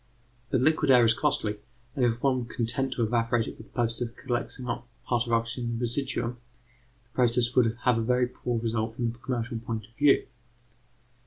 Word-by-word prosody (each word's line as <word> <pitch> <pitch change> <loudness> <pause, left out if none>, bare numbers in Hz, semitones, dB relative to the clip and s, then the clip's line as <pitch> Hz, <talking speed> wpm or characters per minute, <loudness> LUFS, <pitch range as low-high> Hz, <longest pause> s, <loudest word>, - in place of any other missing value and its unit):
But 130 - +2
liquid 155 +1 +3
air 125 -2 +7
is 115 - +5
costly, 125 -6 0 0.4
and 130 - 0
if 120 0 +1
one 135 -2 +3
were 120 -1 -6
content 125 +3 -1
to 120 - 0
evaporate 115 0 +1
it - - -7
for - - -10
the 110 - -16
purpose 115 -2 -1
of 120 -1 -3
collecting 125 +1 -3
a 120 0 -2 0.2
part 120 -1 +1
of - - -7
the 115 - +4
oxygen 115 +2 -2
in 115 - -2
the - - -5
residuum, 120 -1 -1 0.6
the 120 - -35
process 120 -1 +2
would 115 -3 +3
have 125 -2 +3
a - - +1
very 125 +2 +2
poor 120 -1 -3
result 110 0 -2
from 120 -1 -1
the 115 - -13
commercial 120 -2 -3
point 110 -2 -4
of 115 - -28
view. 145 +1 +4
120 Hz, 215 wpm, -28 LUFS, 115-125 Hz, 0.6 s, air